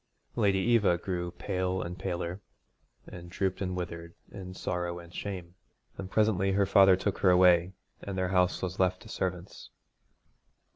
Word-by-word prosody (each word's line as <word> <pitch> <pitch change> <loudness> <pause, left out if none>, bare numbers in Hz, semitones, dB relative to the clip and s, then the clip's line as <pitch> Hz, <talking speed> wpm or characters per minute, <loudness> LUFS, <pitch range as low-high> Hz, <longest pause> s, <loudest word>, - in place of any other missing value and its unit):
Lady 100 -4 +2
Eva 105 -3 +3
grew 90 -1 -3
pale 90 +1 -2
and 90 +1 -7
paler, 90 0 -4 0.6
and 85 -1 -10
drooped 95 +1 -2
and 90 -1 -2
withered 85 -1 -6 0.2
in 95 -2 -8
sorrow 90 -1 -3
and 85 0 -12
shame, 90 -4 -6 0.4
and 95 -1 -7
presently 100 -3 +2
her 100 0 +3
father 95 -1 +6
took 95 +2 -2
her 95 - +4
away, 90 0 +5 0.3
and 100 -1 -6
their 95 -1 0
house 90 -1 +1
was 95 0 -4
left 95 +2 +1
to 110 - -13
servants. 90 -1 -5
90 Hz, 155 wpm, -29 LUFS, 90-95 Hz, 0.6 s, father